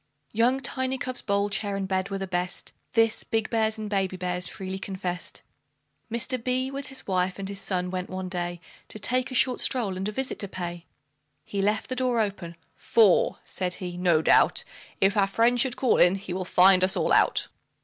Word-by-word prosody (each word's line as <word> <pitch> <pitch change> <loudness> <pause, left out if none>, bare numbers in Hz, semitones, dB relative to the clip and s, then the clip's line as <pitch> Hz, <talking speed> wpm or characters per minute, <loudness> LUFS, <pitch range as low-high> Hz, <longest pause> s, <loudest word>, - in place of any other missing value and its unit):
Young 240 +4 +2
Tiny 260 0 -2
cub's 255 -1 -5
bowl, 200 0 0
chair, 200 0 -1
and 195 -1 -3
bed 190 0 -1
were 195 - -3
the 195 - -4
best, 180 -1 -3 0.2
This, 225 -1 +3
big 225 -1 -2
bears 220 -1 +1
and 215 -1 -5
baby 195 -2 -1
bears 180 0 0
freely 190 +1 -5
confessed. 185 -2 -5 0.7
Mr. 235 +1 -1
B, 255 +1 -1
with 275 0 -6
his 270 - -7
wife 185 -1 0
and 195 -1 -5
his 200 0 -3
son, 180 -2 -1
went 185 -1 -4
one 185 0 -5
day 175 -1 -3 0.3
To - - -8
take 250 +4 +1
a 255 - -6
short 250 0 +2
stroll, 225 -8 +1
and 190 +2 -3
a - - -2
visit 265 +4 -3
to 200 - -2
pay. 175 -2 -6 0.6
He 200 - -3
left 210 +2 0
the 255 - -3
door 250 -2 +1
open, 195 -5 -3 0.2
"For," 215 -6 +3
said 180 -1 -3
he, 180 -2 -6
"no 175 -3 +2
doubt - - +5 0.4
If 195 +1 +3
our 200 -2 +3
friend 230 +5 +2
should 250 0 +3
call 255 - +2
in, 180 +2 +5
he 195 -2 -6
will 185 0 -3
find 185 +1 +5
us 190 - +1
all - - 0
out." - - +3
195 Hz, 205 wpm, -26 LUFS, 185-230 Hz, 0.7 s, doubt